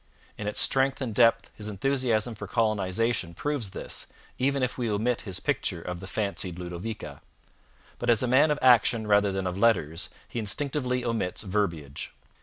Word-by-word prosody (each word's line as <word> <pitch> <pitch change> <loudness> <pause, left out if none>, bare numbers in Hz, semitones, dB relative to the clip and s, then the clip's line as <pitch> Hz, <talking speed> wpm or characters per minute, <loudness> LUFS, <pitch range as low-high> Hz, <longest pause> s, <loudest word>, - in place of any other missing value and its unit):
In 105 - -5
its 105 - -2
strength 135 0 +3
and 125 -5 -3
depth 115 +1 +3
his 105 - -6
enthusiasm 120 +1 0
for 105 -1 -8
colonization 105 -3 0
proves 145 - -2
this, - - -4 0.3
even 135 +1 +1
if 125 - -1
we 120 -3 -2
omit 110 +4 0
his 95 - -1
picture 85 - -1
of 90 +1 -6
the 95 - -8
fancied 100 -4 -2
Ludovica. 90 +5 -6 0.8
But - - -2
as 120 +1 +5
a - - +1
man 130 +5 +5
of 150 - +1
action 120 -2 +5
rather 100 -1 +3
than 95 0 -2
of 90 +1 -3
letters 85 -8 +2 0.2
he - - -5
instinctively 125 +3 0
omits 115 -6 -1
verbiage. 85 -8 -2
110 Hz, 170 wpm, -27 LUFS, 95-125 Hz, 0.8 s, as